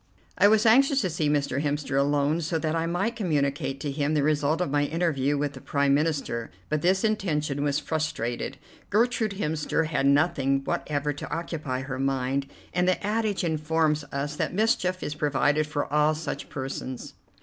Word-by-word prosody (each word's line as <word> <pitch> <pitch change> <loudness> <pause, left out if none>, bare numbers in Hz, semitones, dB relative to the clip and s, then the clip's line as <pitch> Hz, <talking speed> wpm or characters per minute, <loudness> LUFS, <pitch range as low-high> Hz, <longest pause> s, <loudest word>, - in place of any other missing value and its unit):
I 200 - +6
was 215 +1 +4
anxious 270 +5 +5
to 185 -4 -1
see 155 -1 0
Mr. 140 -2 0
Hemster 145 -2 -2
alone, 145 +3 +2
so 165 +1 -1
that 160 0 -1
I 165 0 0
might 195 +7 -1
communicate 145 -8 -1
to 145 - -2
him 145 +2 0
the 145 - +2
result 150 +1 +1
of 180 -6 -1
my 145 0 +2
interview 145 -3 0
with 145 0 -1
the 135 - -10
Prime 140 -1 +1
Minister, 145 -6 0 0.2
but 155 -1 0
this 185 +3 +2
intention 155 -10 0
was 145 -1 +1
frustrated. 140 -5 -2 0.3
Gertrude 225 0 +1
Hemster 160 -2 0
had 145 -3 0
nothing 140 -2 +2
whatever 145 +1 -1
to 145 - -7
occupy 150 -5 -3
her 130 -1 -5
mind, 135 0 0 0.3
and 180 0 +1
the 185 +2 +1
adage 210 -2 0
informs 155 -1 +1
us 145 +2 -3
that - - -2
mischief 185 -4 +1
is 150 - -3
provided 150 +1 +1
for 150 -1 -2
all 150 +1 +3
such 155 -1 -5
persons. 130 -2 -5
150 Hz, 175 wpm, -26 LUFS, 140-170 Hz, 0.3 s, I